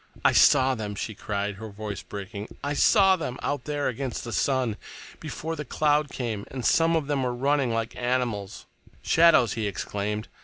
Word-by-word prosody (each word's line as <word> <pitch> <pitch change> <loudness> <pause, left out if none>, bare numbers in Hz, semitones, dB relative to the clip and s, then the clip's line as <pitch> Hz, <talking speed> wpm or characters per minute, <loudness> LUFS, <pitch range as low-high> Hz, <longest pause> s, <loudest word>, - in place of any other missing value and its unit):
"I - - +7
saw 130 0 +5
them," 105 -4 -5
she 110 - -4
cried, 100 -1 -3
her 110 +1 -7
voice 105 -1 -6
breaking. 100 +1 -7 0.2
"I 145 +1 -1
saw 190 +5 +5
them—out 145 -4 -4
there 145 -1 -1
against 130 0 -3
the 120 - -6
sun—before 130 +5 -3
the 150 - -5
cloud 150 +1 +1
came—and 120 +1 -5
some 165 0 +4
of 160 -3 0
them 145 -1 -1
were 125 -1 -1
running, 135 0 +1
like 115 0 -2
animals—" 120 -5 -2 0.4
"Shadows!" 160 -9 +5
he 110 -2 -2
exclaimed. 105 +2 -3
125 Hz, 160 wpm, -26 LUFS, 105-145 Hz, 0.4 s, I